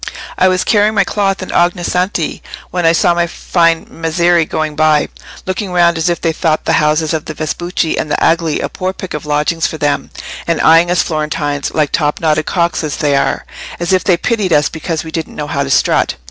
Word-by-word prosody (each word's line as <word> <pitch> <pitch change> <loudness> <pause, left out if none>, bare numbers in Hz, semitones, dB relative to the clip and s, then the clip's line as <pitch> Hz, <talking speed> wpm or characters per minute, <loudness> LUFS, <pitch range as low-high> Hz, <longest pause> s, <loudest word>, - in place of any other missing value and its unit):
I 185 - +3
was 185 0 +2
carrying 210 0 +2
my 200 - +4
cloth 195 -1 -1
in - - -8
Ognissanti, 175 -1 0 0.3
when 175 -2 +1
I - - +6
saw 170 +1 +3
my 170 0 0
fine 165 -1 +1
Messeri 170 +1 +1
going 155 -1 -2
by, 155 -1 +2 0.4
looking 185 +1 -3
round 170 -1 +3
as 165 +1 0
if 170 - -1
they 165 - 0
thought 160 -1 -1
the - - +1
houses 155 +1 +1
of 155 -1 -2
the 155 - -6
Vespucci 160 +3 -2
and 155 - -3
the 145 - 0
Agli 165 -2 +1
a - - -1
poor 185 0 -4
pick 190 -1 -7
of 150 0 -5
lodgings 150 +3 0
for 160 - -6
them, 145 -1 -1 0.4
and 170 -2 0
eyeing 165 +2 +5
us 175 -3 +2
Florentines, 150 -2 -2
like 150 -2 +1
top 150 -1 0
knotted 155 -1 +1
cocks 170 -2 0
as 150 -2 -3
they 145 -2 +1
are, 140 - 0 0.3
as 175 +2 0
if 185 - +2
they 180 -3 +3
pitied 210 -1 -1
us 150 0 +3
because 160 0 -4
we 160 - -8
didn't 160 -1 -5
know 150 - -4
how 140 -1 -2
to 140 - -2
strut. 130 - +2
165 Hz, 215 wpm, -15 LUFS, 155-175 Hz, 0.4 s, I